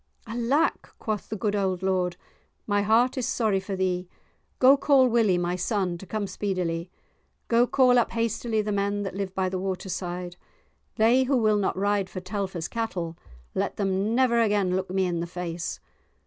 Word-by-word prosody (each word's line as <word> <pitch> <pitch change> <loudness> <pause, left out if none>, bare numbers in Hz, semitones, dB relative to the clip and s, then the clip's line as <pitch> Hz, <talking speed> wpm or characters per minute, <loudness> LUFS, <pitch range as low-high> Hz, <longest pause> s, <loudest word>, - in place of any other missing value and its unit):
"Alack," 240 +7 0
quoth 215 -2 -4
the 215 - -3
good 210 -1 -1
old 190 -2 -1
lord, 180 -2 0 0.5
"my 205 -1 +1
heart 230 +5 +3
is 245 - -1
sorry 215 -5 +1
for 195 +1 -5
thee; 180 -1 -1 0.5
go 260 +2 +7
call 275 -2 +4
Willie, 225 -6 +3
my 175 0 -1
son, 185 -1 -1
to 195 - -11
come 215 -2 -2
speedily. 180 -3 -2 0.6
Go 235 +1 +4
call 250 -2 +4
up 235 - +1
hastily 230 -1 0
the 210 - -2
men 200 0 0
that 195 - -4
live 195 -1 -4
by 190 -1 +1
the 185 0 -2
waterside. 180 -2 -4 0.6
They 240 +4 +4
who 270 0 +2
will 215 -3 +3
not 195 - -1
ride 200 -1 +1
for 185 - -6
Telfer's 185 -3 -4
cattle, 180 -8 -3 0.4
let - - -2
them 195 +2 0
never 240 -2 +3
again 205 -4 +2
look 185 0 -2
me 190 0 +1
in 175 -2 -1
the 170 - -3
face. 175 -1 -5
200 Hz, 175 wpm, -26 LUFS, 185-225 Hz, 0.6 s, go